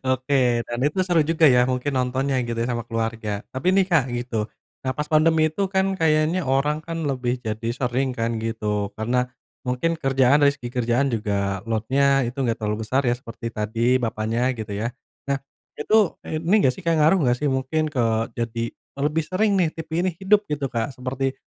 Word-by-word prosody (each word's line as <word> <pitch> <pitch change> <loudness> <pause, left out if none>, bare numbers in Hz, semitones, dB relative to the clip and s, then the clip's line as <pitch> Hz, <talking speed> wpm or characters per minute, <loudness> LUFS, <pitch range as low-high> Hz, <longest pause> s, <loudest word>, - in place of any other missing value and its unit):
Oke, 130 -2 +2
dan 120 - -4
itu 150 +6 -2
seru 175 -3 +2
juga 165 +1 -1
ya, 125 -1 +4
mungkin 130 +2 -1
nontonnya 130 +2 0
gitu 120 - -3
ya, 120 - -1
sama 115 -1 -3
keluarga. 115 -2 -3
Tapi 130 +5 -5
nih, 195 0 +5
Kak, 160 -7 +4
gitu. 120 -3 -2 0.4
Nah 130 - +1
pas 150 - -2
pandemi 155 0 +4
itu 195 +5 -1
kan 190 0 +3
kayaknya 155 +2 +2
orang 140 +3 +1
kan 165 0 -4
lebih 125 -2 -1
jadi 110 0 -3
sering 130 +1 -1
kan 115 -1 -1
gitu, 105 -2 -2
karena, 125 +4 0 0.4
mungkin 125 +7 0
kerjaan 135 -1 +3
dari 140 -1 +4
segi 120 -3 -7
kerjaan 125 +2 +1
juga 100 -3 -1
load-nya 135 +5 +2
itu 120 +3 -5
nggak 120 -4 +1
terlalu 105 0 -1
besar 130 +5 +1
ya, - - +2
seperti 115 -1 -9
tadi 115 +4 +1
bapaknya 115 +2 -1
gitu 110 -2 -6
ya. 105 +3 -2 0.4
Nah, 140 - +2 0.4
itu, 210 +3 +3 0.2
ini 165 +5 0
nggak 130 - +4
sih, 190 - -11
Kak, 165 - +3
ngaruh 155 +5 +4
nggak 120 0 +3
sih, 150 - +2
mungkin 135 +4 -1
ke 125 -4 +1 0.3
jadi 115 0 -2 0.4
lebih 150 +2 +1
sering 205 +3 +1
nih, 170 - +3
TV 160 -1 -8 0.2
ini - - +2
hidup 205 +3 +2
gitu, 150 -2 -2
Kak, 120 +2 -2
seperti 130 +1 -2
130 Hz, 190 wpm, -23 LUFS, 115-150 Hz, 0.4 s, nih